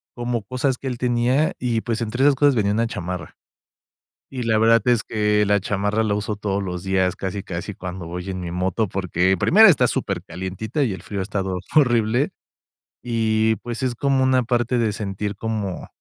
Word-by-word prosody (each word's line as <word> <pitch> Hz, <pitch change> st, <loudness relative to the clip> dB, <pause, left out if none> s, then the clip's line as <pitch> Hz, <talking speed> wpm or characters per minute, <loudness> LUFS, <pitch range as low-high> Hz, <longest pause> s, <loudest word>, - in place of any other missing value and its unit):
como 120 Hz, -1 st, -2 dB
cosas 130 Hz, +3 st, -1 dB
que 135 Hz, -, -7 dB
él 125 Hz, -2 st, -3 dB
tenía, 125 Hz, +5 st, +1 dB
y 120 Hz, -2 st, 0 dB
pues 115 Hz, 0 st, -3 dB
entre 120 Hz, +4 st, -1 dB
esas 145 Hz, -1 st, +5 dB
cosas, 145 Hz, +1 st, +4 dB
venía 100 Hz, -2 st, +1 dB
una 115 Hz, +2 st, +1 dB
chamarra. 90 Hz, -3 st, -6 dB, 0.9 s
Y 130 Hz, -3 st, -4 dB
la 110 Hz, -1 st, +2 dB
verdad 115 Hz, 0 st, +5 dB
es 120 Hz, -3 st, +3 dB
que 105 Hz, -1 st, +1 dB
la 100 Hz, -1 st, +2 dB
chamarra 105 Hz, +2 st, 0 dB
la 105 Hz, -2 st, 0 dB
uso 105 Hz, 0 st, -2 dB
todos 100 Hz, -1 st, -2 dB
los 90 Hz, -1 st, -5 dB
días, 95 Hz, -1 st, +1 dB
casi, 95 Hz, +1 st, -4 dB
casi 90 Hz, +3 st, -5 dB
cuando 90 Hz, -1 st, -7 dB
voy 90 Hz, +2 st, -6 dB
en 95 Hz, -1 st, -4 dB
mi 85 Hz, -1 st, -5 dB
moto, 95 Hz, +4 st, -1 dB
porque 95 Hz, 0 st, +1 dB
primero 215 Hz, -, +7 dB
está 160 Hz, -, +4 dB
supercalientita, 95 Hz, -, -3 dB
y 120 Hz, -, 0 dB
el 95 Hz, -3 st, -6 dB
frío 100 Hz, -2 st, -4 dB
ha -, -, -1 dB
estado 95 Hz, -2 st, -3 dB, 0.2 s
horrible, 120 Hz, -1 st, +3 dB, 0.7 s
y 110 Hz, -2 st, +1 dB
pues 120 Hz, +2 st, -6 dB
es 125 Hz, -2 st, 0 dB
como 135 Hz, +1 st, +1 dB
una 130 Hz, -1 st, +3 dB
parte 120 Hz, 0 st, 0 dB
de 115 Hz, -2 st, +1 dB
sentir 100 Hz, 0 st, -4 dB
como 105 Hz, -5 st, -3 dB
110 Hz, 190 wpm, -22 LUFS, 95-120 Hz, 0.9 s, primero